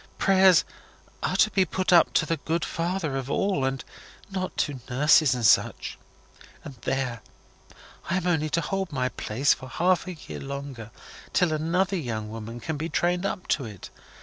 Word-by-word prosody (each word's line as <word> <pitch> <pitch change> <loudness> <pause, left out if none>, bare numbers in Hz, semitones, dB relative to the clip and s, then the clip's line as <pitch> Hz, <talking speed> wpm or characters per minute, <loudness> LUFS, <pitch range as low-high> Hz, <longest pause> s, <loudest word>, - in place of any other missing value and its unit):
Prayers 190 -3 +5 0.6
are - - -1
to 215 - +4
be 195 - +3
put 185 0 0
up 170 - +6
to - - +3
the 165 +1 -1
Good 160 +2 -2
Father 170 -3 -2
of 135 0 -5
All, 195 -4 0
and 135 0 -2 0.5
not 185 -1 -4
to 145 -3 -1
nurses 145 +1 +4
and 120 -2 -2
such. - - +2 0.6
And 140 - -8
there! 125 -4 -2 0.9
I 185 - +1
am 185 - -2
only 160 -4 +1
to 170 - +1
hold 190 +3 -2
my 130 -3 0
place 130 +4 +1
for 130 - -10
half 180 +9 +1
a 185 - -4
year 150 - -9
longer, 140 -4 -7 0.4
till 175 -3 +3
another 180 +5 0
young 110 -8 -4
woman 115 +1 -7
can 155 +5 -4
be 160 +3 -3
trained 175 +3 +1
up 185 -2 -5
to 135 - +1
it. 105 -5 -10
155 Hz, 175 wpm, -26 LUFS, 130-180 Hz, 0.9 s, up